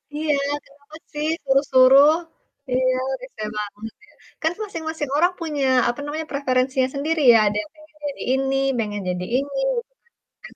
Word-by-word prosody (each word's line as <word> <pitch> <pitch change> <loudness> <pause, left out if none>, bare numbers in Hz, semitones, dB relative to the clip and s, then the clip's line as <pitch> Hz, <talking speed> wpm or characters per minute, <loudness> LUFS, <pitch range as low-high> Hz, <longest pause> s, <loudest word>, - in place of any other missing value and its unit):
Iya, 305 0 0 0.3
kenapa 285 +2 -18 0.2
sih 300 +1 -2 0.2
suruh-suruh. 270 +1 +6 0.6
Iya, 255 0 +2 0.3
rese 255 -4 -11 0.2
banget 210 +1 -6
deh. - - -22 0.3
Kan 320 +1 +1
masing-masing 320 -6 -5
orang 350 +3 +3
punya, 300 -4 -2 0.2
apa 240 - -4
namanya, 310 +2 -4
preferensinya 260 -1 +1
sendiri 310 +3 -1
ya, 230 - +7
ada 205 - -1
yang 210 - -12
pengen 310 0 -20
jadi 280 - -6
ini, 270 0 +1 0.2
pengen 205 -2 -3
jadi 180 0 -3
ini, 280 - -3 0.3
gitu - - -44 0.5
kan. - - -11
275 Hz, 155 wpm, -22 LUFS, 255-305 Hz, 0.6 s, ya